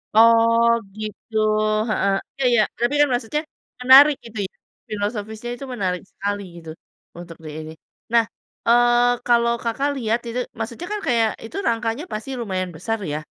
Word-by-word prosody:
Oh 230 +1 +6 0.3
gitu, 215 +1 -6 0.5
heeh, 200 -2 +1 0.2
iya 270 - -2
iya. 230 -2 +5 0.2
Tapi 240 +4 +1
kan 295 - +6
maksudnya 245 +5 -1 0.4
menarik 275 +3 +8
gitu 225 -1 -10
ya, - - -58 0.4
filosofisnya 215 +2 -4
itu 275 - -8
menarik 185 -5 -2
sekali 205 0 -3 0.2
gitu, 165 -1 -10 0.5
untuk 175 -1 -10
diini. 155 +1 -7 0.4
Nah, 230 -1 +5 0.4
eee, 240 0 +4
kalau 235 0 +3
Kakak 270 +5 0
lihat 230 -1 0
itu, 245 +2 -3 0.2
maksudnya 235 +10 -5
kan 420 - -2
kayak 230 -3 +3 0.2
itu 230 - -8
rangkanya 230 +4 -1
pasti 215 +5 -5
lumayan 185 -4 -2
besar 225 +7 -2 0.2
ya, - - -1
230 Hz, 150 wpm, -22 LUFS, 210-240 Hz, 0.5 s, menarik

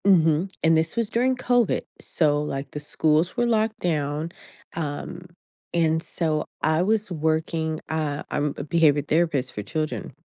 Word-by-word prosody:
Mhm. 170 -1 +4
And 160 0 +5
this 160 0 +1
was 230 -3 0
during 255 +2 +2
COVID. 245 -3 +2 0.2
So 150 -3 +1
like 135 -2 -4
the 150 - -5
schools 155 +5 +1
were 240 - +3
locked 220 -1 +1
down. 155 -1 -1 0.4
Um, 165 +3 -5 0.5
and 160 -1 +2
so 155 -2 -1 0.2
I 155 +1 +2
was 215 +1 +1
working, 160 0 -1
uh, 155 -2 -1
I'm 145 -1 0
a - - -4
behavior 150 -1 +3
therapist 150 -4 +1
for 105 - -4
children. 155 +3 -3
160 Hz, 150 wpm, -24 LUFS, 150-180 Hz, 0.5 s, And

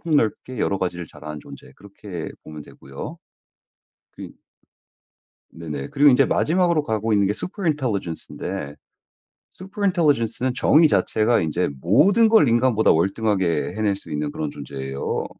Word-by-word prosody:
폭넓게 130 -5 -1
여러 100 - 0
가지를 90 -1 -3
잘하는 75 0 -9
존재 - - -13
그렇게 100 -4 -8 0.2
보면 75 -1 -9
되고요. 70 -1 -10 1.0
그 - - -9 1.2
네네 75 -4 -6
그리고 145 +1 +5
인제 125 - +4
마지막으로 170 -2 +2
가고 110 -3 -1
있는게 100 -1 +2
superintelligence인데 120 - -4 0.8
superintelligence는 160 - 0
정의 155 +5 +5
자체가 110 +1 +2
인제 85 +3 -1
모든 195 - +4
걸 220 -10 +5
인간보다 120 -1 +3
월등하게 95 -1 0
해낼 105 -2 +1
수 95 - -11
있는 75 0 -2
그런 75 -2 -4
존재에요. 70 -1 -5
110 Hz, 410 characters per minute, -22 LUFS, -, 1.2 s, 그리고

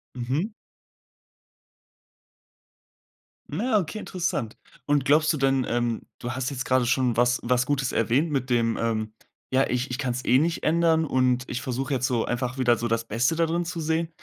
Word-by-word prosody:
Mhm. 140 - -2 3.0
Na, 230 -2 +1
okay, 185 +3 -3
interessant. 165 - -3 0.3
Und 145 -2 +2
glaubst 155 +3 +4
du - - -2
denn 135 -2 +1
ähm, 120 -1 -1 0.2
du 120 - -5
hast 130 +1 -2
jetzt 130 -2 -4
gerade 130 -1 +2
schon 125 -2 +1
was 120 +1 +3
was 125 +1 +1
Gutes 135 -2 0
erwähnt 130 +8 +1
mit 135 -2 -1
dem, 115 -2 +1
ähm: 110 -1 -1 0.4
„Ja, 135 +1 +2
ich 125 +2 -1
ich 125 - -3
kann's 125 -2 -2
eh 130 - +4
nicht 165 +2 0
ändern 165 0 +3
und 130 -3 +1
ich 120 - -3
versuche 130 +2 -3
jetzt 130 -1 +1
so 120 -3 0
einfach 125 +1 -2
wieder 120 -2 +3
so 120 - -2
das 115 0 0
Beste 120 +9 +1
dadrin 165 +1 0
zu 170 -1 -4
sehen.“ 160 +1 0
130 Hz, 175 wpm, -25 LUFS, 120-155 Hz, 3.0 s, glaubst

